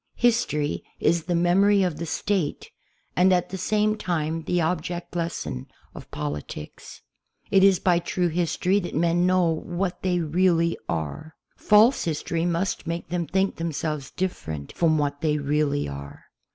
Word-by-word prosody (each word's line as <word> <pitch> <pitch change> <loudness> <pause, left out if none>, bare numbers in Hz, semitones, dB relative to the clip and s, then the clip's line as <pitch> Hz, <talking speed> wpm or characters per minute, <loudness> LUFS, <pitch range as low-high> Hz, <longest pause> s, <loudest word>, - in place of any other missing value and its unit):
History 220 -12 +1 0.2
is 165 0 +2
the 175 0 0
memory 195 +4 +4
of 175 -5 -1
the 165 +1 -5
State 185 -2 -2 0.4
and 180 +3 +4
at 180 -1 +2
the 190 - -5
same 215 +3 +1
time 165 -5 -2
the 175 - +1
object 175 +1 -2
lesson 165 - -3 0.3
of - - -11
politics. 75 0 -7 0.5
It 195 -1 +5
is 195 -2 +6
by 175 -2 +3
true 175 +1 -1
history 180 +3 +1
that 175 - -5
men 170 +3 +2
know 185 -1 +3
what 175 +3 -2
they 180 -1 +1
really 170 +1 +2
are. 80 - -4 0.2
False 215 +5 +4
history 165 +1 -1
must 175 +2 -1
make 170 0 -4
them 170 -1 -2
think 190 +1 0
themselves 155 -3 -3
different 80 - -4
from 160 -2 +2
what 145 -1 -1
they 150 -2 +1
really 145 0 0
are. 70 0 -9
170 Hz, 150 wpm, -25 LUFS, 150-185 Hz, 0.5 s, is